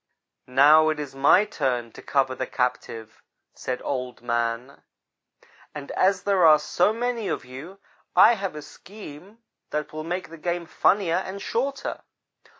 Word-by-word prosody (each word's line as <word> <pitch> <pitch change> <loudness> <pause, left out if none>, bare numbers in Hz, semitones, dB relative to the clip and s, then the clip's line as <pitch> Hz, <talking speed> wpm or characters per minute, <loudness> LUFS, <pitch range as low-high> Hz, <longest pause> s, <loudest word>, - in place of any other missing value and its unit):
"'Now, 150 +5 +6
it 155 -1 -2
is 145 -3 -6
my 140 +9 +4
turn 125 - -2
to - - -12
cover 135 -2 0
the 130 0 -4
captive,' 120 -3 -3 0.3
said 125 - -5
Old 125 -3 -4
man, 120 +2 -2 0.9
'and 145 -2 -7
as 190 0 +1
there 195 -3 +2
are 155 -2 +8
so 175 +6 +1
many 235 -1 -2
of - - -3
you, 140 +10 -10 0.4
I 230 - +8
have 195 -6 -4
a 150 - -7
scheme 200 +5 -13 0.3
that 150 0 -4
will 155 0 -5
make 175 +1 -4
the 165 - -11
game 175 +1 -2
funnier 175 0 +2
and 190 +1 -5
shorter. 270 +7 -3
155 Hz, 150 wpm, -25 LUFS, 130-195 Hz, 0.9 s, are